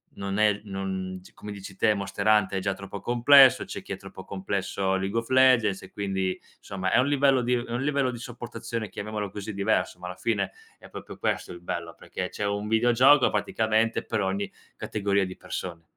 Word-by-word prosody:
non 100 Hz, +1 st, -3 dB
è 105 Hz, -1 st, +3 dB
non 95 Hz, -1 st, -4 dB
c -, -, -17 dB
come 105 Hz, -, -9 dB
dici 100 Hz, -1 st, -9 dB
te 105 Hz, +2 st, +3 dB
Monster 100 Hz, +1 st, -3 dB
Hunter 105 Hz, -3 st, +4 dB
è -, -, -6 dB
già 100 Hz, 0 st, 0 dB
troppo 100 Hz, +1 st, -8 dB
complesso. 130 Hz, +2 st, +6 dB
C'è -, -, -7 dB
chi -, -, -6 dB
è -, -, -5 dB
troppo -, -, -11 dB
complesso 95 Hz, 0 st, -2 dB
League 95 Hz, +3 st, -2 dB
of 115 Hz, 0 st, -2 dB
Legends 125 Hz, -6 st, +4 dB
e 95 Hz, -, -12 dB
quindi 95 Hz, -2 st, -2 dB, 0.2 s
somma 95 Hz, -1 st, -3 dB
è -, -, +4 dB
un 130 Hz, -, +3 dB
livello 140 Hz, -2 st, +3 dB
di 125 Hz, +1 st, +1 dB
uhm, 120 Hz, 0 st, -2 dB
è 115 Hz, -, -10 dB
un 120 Hz, -, -1 dB
livello 140 Hz, -2 st, +1 dB
di 120 Hz, -, -7 dB
sopportazione, 115 Hz, -2 st, -6 dB
chiamiamolo 105 Hz, +1 st, -5 dB
così, 105 Hz, +2 st, -6 dB
diverso, 100 Hz, -2 st, 0 dB
ma 90 Hz, -, -7 dB
alla 90 Hz, -, -6 dB
fine 100 Hz, -5 st, -1 dB, 0.3 s
è -, -, -15 dB
proprio -, -, -9 dB
questo -, -, -2 dB
il 85 Hz, -, -11 dB
bello, 85 Hz, -1 st, -5 dB
perché 90 Hz, -, -5 dB
c'è -, -, -5 dB
un 100 Hz, +1 st, -2 dB
videogioco 120 Hz, +5 st, +5 dB
praticamente 110 Hz, +2 st, +1 dB
per 110 Hz, -, -2 dB
ogni 95 Hz, +1 st, -2 dB, 0.2 s
categoria 100 Hz, -1 st, 0 dB
di 95 Hz, 0 st, -8 dB
persone. 85 Hz, -2 st, -6 dB
100 Hz, 205 wpm, -26 LUFS, 95-115 Hz, 0.3 s, complesso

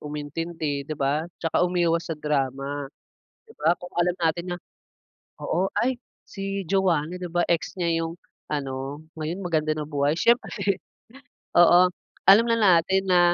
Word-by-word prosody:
umintindi 150 Hz, 0 st, -4 dB
di 155 Hz, -, -5 dB
ba, 145 Hz, +3 st, 0 dB
'tsaka 165 Hz, +1 st, +1 dB
umiwas 170 Hz, -2 st, +1 dB
sa 160 Hz, -, -3 dB
drama 140 Hz, -1 st, -2 dB, 0.6 s
di 445 Hz, -, -15 dB
ba, 170 Hz, -, +3 dB
kung 180 Hz, -, -10 dB
alam 175 Hz, +1 st, +2 dB
natin 170 Hz, +1 st, 0 dB
na -, -, -9 dB, 0.8 s
oo, 185 Hz, +3 st, 0 dB
"ay 255 Hz, +1 st, +1 dB, 0.3 s
si 195 Hz, -1 st, -4 dB
Joanna 180 Hz, -4 st, +1 dB
di 180 Hz, -1 st, -5 dB
ba 175 Hz, -, +1 dB
ex 170 Hz, -1 st, 0 dB
niya 165 Hz, -1 st, +1 dB
yung 165 Hz, +1 st, -6 dB, 0.4 s
ano 135 Hz, 0 st, -4 dB, 0.2 s
ngayon 160 Hz, +5 st, -4 dB
maganda 155 Hz, -3 st, +1 dB
na 150 Hz, -, -3 dB
buhay" 145 Hz, 0 st, +1 dB
siyempre 205 Hz, -5 st, +2 dB, 0.8 s
oo 175 Hz, +1 st, +7 dB, 0.4 s
alam 215 Hz, +4 st, +7 dB
na 230 Hz, -, +4 dB
natin 190 Hz, -1 st, +4 dB
na, 180 Hz, -1 st, +4 dB
170 Hz, 150 wpm, -25 LUFS, 150-180 Hz, 0.8 s, oo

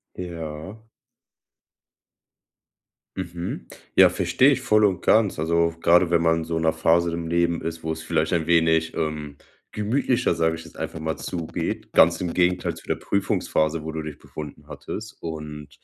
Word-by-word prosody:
Ja. 85 Hz, +5 st, -7 dB, 2.3 s
Mhm. 85 Hz, -1 st, -5 dB, 0.3 s
Ja, -, -, +8 dB
verstehe 135 Hz, +2 st, +3 dB
ich 130 Hz, -, -1 dB
voll 110 Hz, -4 st, +3 dB
und 95 Hz, -4 st, +1 dB
ganz. 110 Hz, -6 st, +3 dB
Also, 85 Hz, +1 st, +1 dB
grade 85 Hz, +1 st, +4 dB
wenn 85 Hz, -1 st, +3 dB
man 80 Hz, -1 st, +2 dB
so 80 Hz, 0 st, -3 dB
in 80 Hz, -, -1 dB
'ner 80 Hz, -, +3 dB
Phase 85 Hz, +1 st, +2 dB
im 85 Hz, 0 st, -3 dB
Leben 85 Hz, 0 st, +1 dB
ist, 80 Hz, 0 st, -5 dB
wo 80 Hz, 0 st, -2 dB
es 80 Hz, 0 st, -7 dB
vielleicht 80 Hz, 0 st, 0 dB
ein 85 Hz, -3 st, +1 dB
wenig, 80 Hz, -1 st, +3 dB
ähm, 75 Hz, -2 st, -3 dB, 0.4 s
gemütlicher, 120 Hz, +4 st, +1 dB
sage 80 Hz, 0 st, +1 dB
ich 80 Hz, -, -10 dB
jetzt -, -, -15 dB
einfach 80 Hz, -, -5 dB
mal, 80 Hz, 0 st, -2 dB
zugeht, 85 Hz, -3 st, -4 dB
ganz 85 Hz, +2 st, +5 dB
im 90 Hz, -2 st, -2 dB
Gegenteil 90 Hz, 0 st, +1 dB
zu -, -, -14 dB
der -, -, +1 dB
Prüfungsphase, 80 Hz, -5 st, 0 dB
wo 80 Hz, -, -4 dB
du 80 Hz, -1 st, -4 dB
dich 75 Hz, -2 st, -7 dB
befunden 75 Hz, -1 st, -9 dB
hattest. 110 Hz, 0 st, -7 dB
Und 75 Hz, -2 st, -6 dB
85 Hz, 165 wpm, -24 LUFS, 80-90 Hz, 2.3 s, Ja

